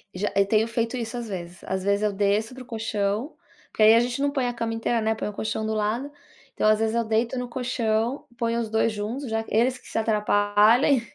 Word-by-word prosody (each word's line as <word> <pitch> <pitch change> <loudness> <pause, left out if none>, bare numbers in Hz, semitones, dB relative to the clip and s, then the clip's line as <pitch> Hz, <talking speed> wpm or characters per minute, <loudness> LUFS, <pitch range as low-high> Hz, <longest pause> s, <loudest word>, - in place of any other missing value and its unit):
Já, 205 +3 -1
eu 200 0 +4
tenho 220 +2 +2
feito 230 +1 -2
isso 235 0 -4
às 235 -1 -5
vezes. 175 -3 -7
Às 190 0 -3
vezes, 200 +1 +1
eu 210 -1 +1
desço 205 +4 0
para 260 0 -9
o - - -18
colchão, 220 +2 -2 0.4
porque - - -4
aí 220 +1 +8
a - - +6
gente 245 +3 -1
não 285 - +2
põe 265 -3 0
a 245 - -1
cama 230 -1 -3
inteira, 225 0 0
né, 220 0 +1
põe - - -4
o 210 - -5
colchão 220 +1 -3
do 220 - -1
lado. 220 +7 -1 0.4
Então, - - +1
às 215 0 +4
vezes, 225 +1 0
eu 235 - +2
deito 225 +3 0
no 250 -1 -5
colchão, 240 0 -1
ponho 230 0 0
os 225 - -3
2 220 +1 +2
juntos 220 +6 -4
já 225 0 -1
eles 250 +4 +2
que - - -18
se - - -5
atrapalhem, 215 +4 +3
225 Hz, 240 wpm, -25 LUFS, 210-240 Hz, 0.4 s, aí